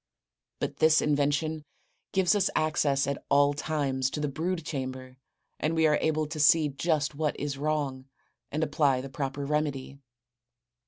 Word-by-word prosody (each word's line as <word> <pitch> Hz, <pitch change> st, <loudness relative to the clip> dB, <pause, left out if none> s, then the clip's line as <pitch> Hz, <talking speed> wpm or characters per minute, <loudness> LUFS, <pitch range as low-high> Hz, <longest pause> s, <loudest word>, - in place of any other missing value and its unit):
But -, -, -3 dB
this 155 Hz, 0 st, +5 dB
invention 150 Hz, +2 st, 0 dB, 0.5 s
gives 190 Hz, -2 st, +3 dB
us 205 Hz, -3 st, +2 dB
access 150 Hz, -3 st, +1 dB
at 140 Hz, 0 st, -3 dB
all 145 Hz, 0 st, +4 dB
times 140 Hz, -3 st, -1 dB
to 150 Hz, -, -5 dB
the 150 Hz, -, -1 dB
brood 165 Hz, +3 st, -3 dB
chamber 130 Hz, -2 st, -5 dB, 0.4 s
and 160 Hz, +2 st, 0 dB
we 160 Hz, 0 st, +3 dB
are 150 Hz, -1 st, +3 dB
able 155 Hz, -1 st, +1 dB
to 155 Hz, +1 st, -6 dB
see 150 Hz, +1 st, +5 dB
just 150 Hz, 0 st, 0 dB
what 150 Hz, 0 st, -2 dB
is 140 Hz, -1 st, -3 dB
wrong 145 Hz, -3 st, -2 dB, 0.5 s
and 155 Hz, +2 st, -1 dB
apply 140 Hz, -5 st, +2 dB
the 135 Hz, -, -7 dB
proper 135 Hz, +1 st, -4 dB
remedy. 140 Hz, -2 st, -2 dB
145 Hz, 155 wpm, -28 LUFS, 140-155 Hz, 0.5 s, this